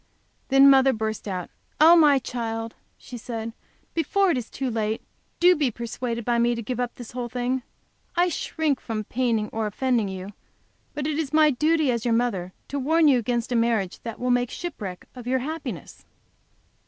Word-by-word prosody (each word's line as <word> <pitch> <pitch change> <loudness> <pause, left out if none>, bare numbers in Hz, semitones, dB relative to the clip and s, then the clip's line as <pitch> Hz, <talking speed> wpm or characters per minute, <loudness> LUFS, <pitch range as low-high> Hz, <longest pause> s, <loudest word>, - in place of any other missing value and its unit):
Then 270 0 +6
mother 270 -1 +6
burst 220 -1 -3
out, 185 -3 -4 0.3
"Oh, 325 +3 +8
my 300 -4 +6
child," 230 -3 -4 0.2
she 245 - -9
said, 225 -1 -5 0.4
"before 365 +4 +2
it 280 - 0
is 230 - -8
too 265 -2 -3
late, 220 -1 -2 0.4
do 360 +1 +6
be 295 -5 +1
persuaded 235 0 -4
by 240 -1 +2
me 240 0 +2
to 230 - -5
give 245 +3 -4
up 245 -1 -2
this 240 -3 -9
whole 245 -1 -4
thing. 250 +2 -1 0.5
I 350 +1 +3
shrink 310 -4 -1
from 220 -2 -3
paining 230 -2 0
or 220 -1 -2
offending 235 0 0
you, 190 +2 -7 0.6
but 290 -1 -3
it 305 0 -1
is 295 -4 -2
my 310 -1 +6
duty, 305 +1 +2
as 235 -2 -2
your 235 -2 +2
mother, 200 -7 -1 0.2
to 280 - -2
warn 320 +4 +3
you 265 -4 +5
against 240 +1 -2
a - - +1
marriage 230 -5 +1
that 230 -2 -7
will 250 0 0
make 245 -1 +2
shipwreck 210 - -6
of 245 -2 -10
your 260 +1 +2
happiness." 260 - -6
245 Hz, 190 wpm, -25 LUFS, 225-280 Hz, 0.6 s, Oh